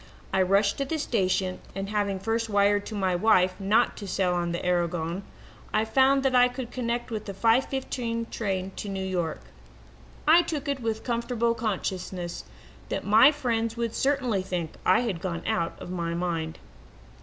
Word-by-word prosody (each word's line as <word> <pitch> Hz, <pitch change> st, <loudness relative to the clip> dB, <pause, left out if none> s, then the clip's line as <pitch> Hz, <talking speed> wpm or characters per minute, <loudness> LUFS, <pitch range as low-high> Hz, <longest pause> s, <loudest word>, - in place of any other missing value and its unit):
I 190 Hz, -, +3 dB
rushed 195 Hz, +5 st, +2 dB
to 275 Hz, -, 0 dB
the 315 Hz, +4 st, -2 dB
station 190 Hz, -8 st, 0 dB, 0.2 s
and, 195 Hz, 0 st, -4 dB
having 205 Hz, -2 st, -1 dB
first 225 Hz, +3 st, -1 dB
wired 205 Hz, 0 st, +2 dB
to 220 Hz, -, -6 dB
my 190 Hz, -3 st, +1 dB
wife 185 Hz, -1 st, +4 dB
not 200 Hz, +2 st, +2 dB
to 205 Hz, -, -7 dB
sail 185 Hz, -1 st, +1 dB
on 175 Hz, -1 st, -1 dB
the 170 Hz, -, -3 dB
Aragon, 175 Hz, 0 st, 0 dB, 0.5 s
I 215 Hz, +1 st, +2 dB
found 270 Hz, +4 st, +3 dB
that 265 Hz, -1 st, +2 dB
I 250 Hz, 0 st, +6 dB
could 250 Hz, -1 st, -6 dB
connect 240 Hz, -1 st, -2 dB
with 215 Hz, -1 st, -4 dB
the 195 Hz, -, -6 dB
five 230 Hz, +6 st, +3 dB
fifteen 235 Hz, -3 st, -3 dB
train 195 Hz, -3 st, -2 dB
for -, -, -5 dB
New 195 Hz, -1 st, -3 dB
York. 175 Hz, -4 st, -2 dB, 0.9 s
I 330 Hz, +3 st, +8 dB
took 310 Hz, -5 st, -4 dB
it 280 Hz, -1 st, -1 dB
with 225 Hz, -2 st, -1 dB
the -, -, -16 dB
comfortable 235 Hz, -1 st, 0 dB
consciousness 185 Hz, -5 st, -3 dB, 0.4 s
that -, -, -3 dB
my 220 Hz, +7 st, +7 dB
friends 230 Hz, -6 st, -1 dB
would 230 Hz, -1 st, -2 dB
certainly 255 Hz, -8 st, +1 dB
think 180 Hz, -4 st, -3 dB, 0.2 s
I 185 Hz, -, +5 dB
had 205 Hz, -9 st, -2 dB
gone 170 Hz, -3 st, -3 dB
out 170 Hz, -1 st, -1 dB
of -, -, -8 dB
my 170 Hz, -2 st, -2 dB
mind. 165 Hz, -2 st, -2 dB
205 Hz, 180 wpm, -27 LUFS, 185-235 Hz, 0.9 s, I